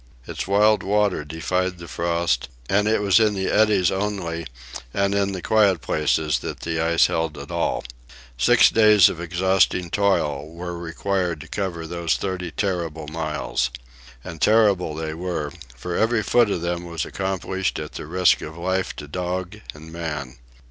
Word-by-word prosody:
Its -, -, -5 dB
wild 105 Hz, +2 st, +4 dB
water 100 Hz, -4 st, +1 dB
defied 90 Hz, +4 st, -2 dB
the 85 Hz, 0 st, -10 dB
frost, 85 Hz, -5 st, -1 dB, 0.2 s
and 105 Hz, +5 st, +2 dB
it 110 Hz, -1 st, +2 dB
was 100 Hz, +1 st, +5 dB
in 105 Hz, -2 st, +3 dB
the 95 Hz, -1 st, -1 dB
eddies 105 Hz, -4 st, +3 dB
only 95 Hz, -5 st, -3 dB, 0.5 s
and 100 Hz, 0 st, +1 dB
in 100 Hz, -1 st, +1 dB
the 95 Hz, -3 st, -6 dB
quiet 100 Hz, -5 st, +3 dB
places 75 Hz, -1 st, 0 dB
that -, -, -6 dB
the 80 Hz, -1 st, -2 dB
ice 85 Hz, 0 st, +4 dB
held 80 Hz, -2 st, -1 dB
at 70 Hz, +2 st, -8 dB
all. 85 Hz, -1 st, -1 dB, 0.5 s
Six -, -, +5 dB
days 105 Hz, -4 st, +6 dB
of 85 Hz, -, -6 dB
exhausting 90 Hz, 0 st, +1 dB
toil 75 Hz, -8 st, +1 dB
were 90 Hz, +1 st, -6 dB
required 85 Hz, 0 st, -2 dB
to -, -, -10 dB
cover 90 Hz, -5 st, -3 dB
those 85 Hz, 0 st, -1 dB
thirty 95 Hz, -2 st, -3 dB
terrible 85 Hz, -5 st, -3 dB
miles. 75 Hz, -4 st, -2 dB, 0.5 s
And 80 Hz, -1 st, -9 dB
terrible 100 Hz, -7 st, +3 dB
they 80 Hz, 0 st, -4 dB
were, 80 Hz, -3 st, -3 dB, 0.2 s
for 85 Hz, +8 st, -5 dB
every 110 Hz, +1 st, +2 dB
foot 120 Hz, -1 st, +3 dB
of 90 Hz, -, -1 dB
them 85 Hz, 0 st, -2 dB
was 85 Hz, -3 st, -3 dB
accomplished 95 Hz, 0 st, -2 dB
at 75 Hz, -1 st, -6 dB
the -, -, -7 dB
risk 90 Hz, +2 st, +3 dB
of 80 Hz, +2 st, -8 dB
life 95 Hz, +2 st, -1 dB
to 70 Hz, -, -8 dB
dog 90 Hz, +3 st, -4 dB
and 80 Hz, +2 st, -12 dB
man. 75 Hz, -6 st, -5 dB
90 Hz, 165 wpm, -23 LUFS, 80-95 Hz, 0.5 s, days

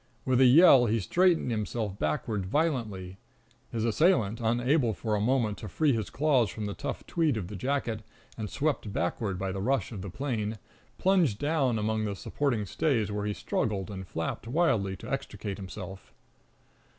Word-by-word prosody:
With 130 Hz, 0 st, +3 dB
a -, -, +8 dB
yell 130 Hz, -2 st, +7 dB
he 115 Hz, +1 st, +1 dB
straightened 175 Hz, -, +2 dB
himself 105 Hz, -2 st, -3 dB
backward 95 Hz, +6 st, -1 dB
violently. 105 Hz, -, -1 dB, 0.5 s
His 115 Hz, -1 st, -1 dB
assailant, 115 Hz, -, +2 dB
unable 120 Hz, +1 st, +2 dB
for 110 Hz, -2 st, -2 dB
a 105 Hz, -, +1 dB
moment 115 Hz, -3 st, +1 dB
to 110 Hz, -, -7 dB
free 145 Hz, -, +2 dB
his 110 Hz, -3 st, -2 dB
claws 135 Hz, -6 st, +2 dB
from 110 Hz, -, -5 dB
the 100 Hz, -, -3 dB
tough -, -, -5 dB
tweed 160 Hz, -8 st, +1 dB
of 95 Hz, -4 st, -4 dB
the 105 Hz, -, -6 dB
jacket, 120 Hz, 0 st, -1 dB, 0.3 s
and 110 Hz, -2 st, -5 dB
swept 140 Hz, -8 st, -1 dB
backward 95 Hz, +2 st, -1 dB
by 95 Hz, +1 st, -2 dB
the 95 Hz, +1 st, -4 dB
rush 130 Hz, +5 st, 0 dB
of 105 Hz, -5 st, -6 dB
the 100 Hz, -, -6 dB
plane, 110 Hz, -2 st, -3 dB, 0.4 s
plunged 180 Hz, -, +3 dB
down 145 Hz, -4 st, +1 dB
among 110 Hz, 0 st, 0 dB
the 100 Hz, -1 st, -2 dB
supporting 120 Hz, +1 st, -1 dB
stays, 110 Hz, -, 0 dB
where 105 Hz, 0 st, -2 dB
he 105 Hz, -, -1 dB
struggled 100 Hz, -2 st, -2 dB
and 95 Hz, -2 st, -7 dB
flapped 80 Hz, +7 st, -4 dB
wildly 115 Hz, -, +1 dB
to -, -, -9 dB
extricate 100 Hz, -2 st, -4 dB
himself. 95 Hz, -1 st, -8 dB
110 Hz, 175 wpm, -29 LUFS, 100-135 Hz, 0.5 s, a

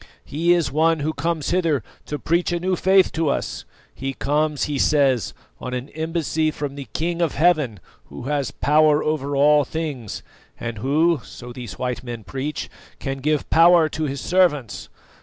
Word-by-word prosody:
He 165 Hz, +4 st, +1 dB
is 170 Hz, -4 st, +1 dB
one 160 Hz, +2 st, +2 dB
who 155 Hz, +2 st, -1 dB
comes 160 Hz, 0 st, -2 dB
hither 165 Hz, -, +1 dB, 0.2 s
to 150 Hz, -, -3 dB
preach 170 Hz, +4 st, 0 dB
a 175 Hz, -, 0 dB
new 185 Hz, +1 st, 0 dB
faith 190 Hz, +1 st, +4 dB
to 160 Hz, -2 st, 0 dB
us; -, -, -3 dB, 0.3 s
he 135 Hz, 0 st, -4 dB
comes, 150 Hz, +1 st, 0 dB
he 145 Hz, -2 st, -1 dB
says, 135 Hz, -6 st, +2 dB, 0.2 s
on 125 Hz, 0 st, -4 dB
an 125 Hz, +3 st, -5 dB
embassy 160 Hz, 0 st, -1 dB
from 145 Hz, -2 st, -4 dB
the 140 Hz, -1 st, -8 dB
King 170 Hz, +1 st, -2 dB
of 165 Hz, -4 st, 0 dB
Heaven, 150 Hz, -, +2 dB, 0.3 s
who -, -, -10 dB
has 140 Hz, +1 st, -1 dB
power 150 Hz, +1 st, +3 dB
over 145 Hz, -2 st, -1 dB
all 145 Hz, +1 st, +5 dB
things, 140 Hz, -7 st, -5 dB, 0.4 s
and 115 Hz, -2 st, -5 dB
who, 155 Hz, +5 st, +2 dB
so 120 Hz, 0 st, -10 dB
these 120 Hz, -7 st, -8 dB
white 125 Hz, 0 st, -3 dB
men 120 Hz, -3 st, -6 dB
preach, 140 Hz, +7 st, -4 dB, 0.3 s
can 135 Hz, -1 st, -4 dB
give 150 Hz, +2 st, 0 dB
power 170 Hz, -1 st, +6 dB
to 155 Hz, +1 st, -3 dB
His 140 Hz, -2 st, -4 dB
servants. 170 Hz, -, +1 dB
150 Hz, 175 wpm, -22 LUFS, 135-165 Hz, 0.4 s, power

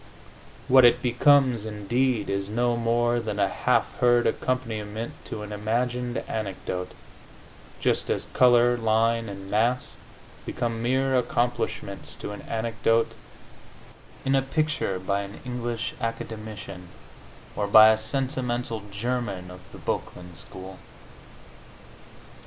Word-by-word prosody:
What 130 Hz, 0 st, +7 dB
it 120 Hz, 0 st, +5 dB
becomes, 125 Hz, -1 st, +4 dB
indeed, 110 Hz, +2 st, 0 dB
is 100 Hz, 0 st, -2 dB
no 120 Hz, +2 st, +1 dB
more 120 Hz, +1 st, +1 dB
than 110 Hz, -3 st, -4 dB
a 100 Hz, -, +4 dB
half -, -, +1 dB
heard 120 Hz, -1 st, +4 dB
accompaniment 115 Hz, -3 st, -2 dB
to 105 Hz, -, -5 dB
an 105 Hz, -, -8 dB
imagined 120 Hz, +4 st, -1 dB
anecdote, 95 Hz, -4 st, -4 dB, 0.9 s
just -, -, 0 dB
as -, -, 0 dB
color, 120 Hz, -1 st, +5 dB
line 115 Hz, 0 st, +1 dB
and 95 Hz, -1 st, -8 dB
mass 120 Hz, +4 st, +1 dB, 0.5 s
become 115 Hz, -1 st, -3 dB
mere 130 Hz, +2 st, +1 dB
accomplishments 120 Hz, -1 st, -1 dB
to -, -, -6 dB
an 105 Hz, -, -7 dB
anecdote 115 Hz, 0 st, +1 dB, 1.1 s
in 135 Hz, -, +2 dB
a 135 Hz, -, +4 dB
picture 145 Hz, -7 st, -1 dB
by 100 Hz, +2 st, -1 dB
an 100 Hz, +1 st, -8 dB
English 120 Hz, -2 st, -3 dB
academician, 110 Hz, -5 st, -6 dB, 0.7 s
or 105 Hz, -, -1 dB
by 110 Hz, +2 st, +9 dB
a 110 Hz, -, +4 dB
sentimental 125 Hz, -1 st, -2 dB
German 100 Hz, -4 st, -3 dB
of 90 Hz, -, -10 dB
the -, -, -11 dB
Boecklin 90 Hz, 0 st, -4 dB
school. 95 Hz, +3 st, -9 dB
115 Hz, 120 wpm, -26 LUFS, 105-125 Hz, 1.1 s, by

